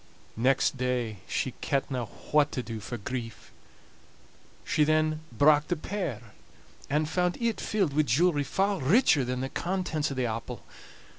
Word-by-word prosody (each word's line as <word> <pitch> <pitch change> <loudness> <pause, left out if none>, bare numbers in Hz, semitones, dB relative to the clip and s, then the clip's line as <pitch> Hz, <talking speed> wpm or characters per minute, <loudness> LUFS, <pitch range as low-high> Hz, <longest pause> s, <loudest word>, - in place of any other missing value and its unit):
Next 130 +3 +2
day 125 -4 -1
she 130 - -1
kentna 135 -3 -1 0.3
what 150 -1 +4
to 125 - -2
do 115 -2 -6
for 115 +4 -6
grief. 115 0 -6 1.1
She 155 - +2
then 155 0 +2
brak 145 +5 +4
the 175 - 0
pear, 155 - -4 0.6
and 150 +2 +1
found 180 +2 0
it 235 -2 -1
filled 195 -9 0
wi' 155 - +5
jewelry 145 +3 +2
far 195 +7 0
richer 150 - +4
than 125 +1 -2
the 135 - -3
contents 170 -5 -2
o' - - -4
the 130 -1 0
apple. 115 0 -5
145 Hz, 150 wpm, -28 LUFS, 125-165 Hz, 1.1 s, wi